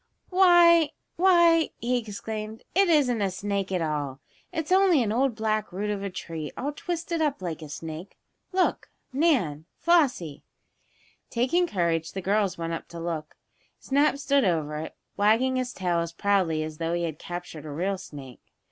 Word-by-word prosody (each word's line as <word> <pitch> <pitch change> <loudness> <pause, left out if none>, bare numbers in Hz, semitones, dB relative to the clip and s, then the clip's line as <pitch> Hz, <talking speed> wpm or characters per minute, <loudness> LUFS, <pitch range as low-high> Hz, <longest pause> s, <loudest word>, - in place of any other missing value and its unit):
"Why 345 -4 +6 0.2
why!" 340 -3 +5
he 245 +1 0
exclaimed. 220 +1 -6
"It 390 0 +4
isn't 260 -8 +3
a 195 - +1
snake 195 +1 -3
at 180 -3 0
all! 145 -4 -3 0.3
It's 325 -2 -4
only 370 -7 +5
an 210 - -1
old 250 +1 +1
black 215 -1 -1
root 205 +3 -2
of 205 -1 -3
a 200 - -3
tree, 165 -4 -6
all 285 +3 -2
twisted 335 +1 -3
up 295 -3 0
like 170 -4 -5
a 155 - -8
snake! 160 +4 -7 0.3
Look, 370 -1 0 0.2
Nan 240 - +1
Flossie!" 265 - +2 0.9
Taking 265 +10 +1
courage, 170 - -1
the 195 - -3
girls 200 0 +1
went 165 0 -3
up 165 - -5
to 170 - -9
look. 165 -2 -5 0.4
Snap 280 +1 +2
stood 280 -1 +2
over 155 -6 0
it, 155 - -6 0.2
wagging 225 +6 +3
his 255 -1 -2
tail 175 -5 -1
as 170 0 -3
proudly 185 -6 +1
as 155 0 -7
though 165 0 -1
he 175 - -1
had 160 -3 -4
captured 175 -3 -7
a - - -6
real 185 +6 -2
snake. 140 -8 -10
205 Hz, 170 wpm, -26 LUFS, -, 0.9 s, Why